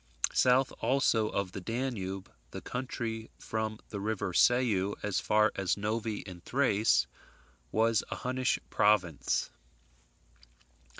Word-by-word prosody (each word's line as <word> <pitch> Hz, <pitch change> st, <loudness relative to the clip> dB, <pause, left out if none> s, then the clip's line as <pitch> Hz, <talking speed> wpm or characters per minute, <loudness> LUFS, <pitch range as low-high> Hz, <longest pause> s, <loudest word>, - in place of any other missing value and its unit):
South 130 Hz, +1 st, +4 dB
also 115 Hz, -3 st, +2 dB
of 100 Hz, -2 st, -2 dB
the 95 Hz, -, -6 dB
Danube, 100 Hz, -4 st, -3 dB, 0.2 s
the -, -, -7 dB
country 120 Hz, -3 st, -4 dB
from 110 Hz, -1 st, -3 dB
the 100 Hz, -, -5 dB
river 100 Hz, -3 st, -2 dB
Sau 105 Hz, -4 st, +3 dB
as 105 Hz, -2 st, 0 dB
far 105 Hz, 0 st, +3 dB
as 95 Hz, -1 st, 0 dB
Novi 105 Hz, +1 st, -2 dB
in 90 Hz, -2 st, -10 dB
Thrace 105 Hz, -, +2 dB, 0.7 s
was 110 Hz, -1 st, +2 dB
a -, -, -3 dB
Hunnish 130 Hz, +1 st, 0 dB
province. 95 Hz, -8 st, +2 dB
110 Hz, 115 wpm, -31 LUFS, 100-120 Hz, 0.7 s, South